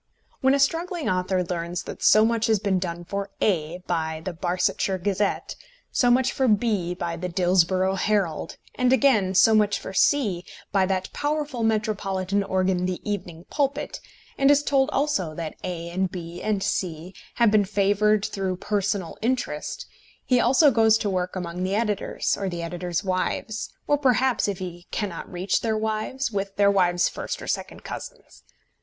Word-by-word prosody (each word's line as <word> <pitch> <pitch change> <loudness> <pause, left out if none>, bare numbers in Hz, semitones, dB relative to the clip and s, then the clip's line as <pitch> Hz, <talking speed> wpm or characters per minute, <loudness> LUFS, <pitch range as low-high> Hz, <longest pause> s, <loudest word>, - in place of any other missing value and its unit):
When 265 +1 +4
a - - 0
struggling 335 +3 0
author 185 0 +1
learns 170 0 -3
that - - -8
so 215 +1 +6
much 230 -1 +1
has 220 -1 +3
been 195 -2 0
done 175 -1 -4
for 200 +2 -4
A 175 -2 0
by 160 -2 -2
the 185 - -3
Barsetshire 180 +2 0
Gazette, 200 +2 -1 0.4
so 245 - +3
much 255 +2 +3
for 265 - +1
B 205 -5 +1
by 170 -1 -3
the 180 +2 -4
Dillsborough 185 +1 +2
Herald, 200 -7 0 0.2
and, 250 0 +1
again, 220 -8 +3
so 210 +4 +6
much 210 -1 +3
for - - -8
C 200 -6 +2 0.3
by 195 -2 +2
that 190 -1 -2
powerful 290 -4 -2
metropolitan 205 -3 0
organ 185 -1 0
the 185 -1 -3
Evening 180 -4 -4
Pulpit, 285 0 -1 0.4
and 275 0 +5
is 290 0 +5
told 275 -1 +2
also 265 - 0
that 165 -1 -4
A 170 -2 -4
and 185 +1 -1
B 170 -1 -7
and 210 -3 0
C 180 -2 -3 0.2
have 235 -3 +4
been 210 -1 +4
favoured 205 +1 +2
through 190 -2 -2
personal 200 -2 -2
interest, 255 +3 -2 0.4
he 250 -1 +3
also 265 +5 +5
goes 225 -2 +4
to 210 -2 -2
work 180 0 -2
among 175 -1 -4
the 190 +2 0
editors, 210 -2 0
or 195 -1 -3
the 170 -1 -4
editors' 175 +1 -3
wives, 190 +3 -2
or 290 -1 +2
perhaps, 260 -3 +2
if 200 -2 -2
he 175 -1 -7
cannot 195 -6 -4
reach 185 +2 0
their 220 -1 0
wives, 220 +4 -2
with 195 -1 -3
their 200 0 +4
wives' 175 -3 +3
first - - -5
or - - -8
second - - -4
cousins. - - -9
195 Hz, 170 wpm, -25 LUFS, 180-225 Hz, 0.4 s, so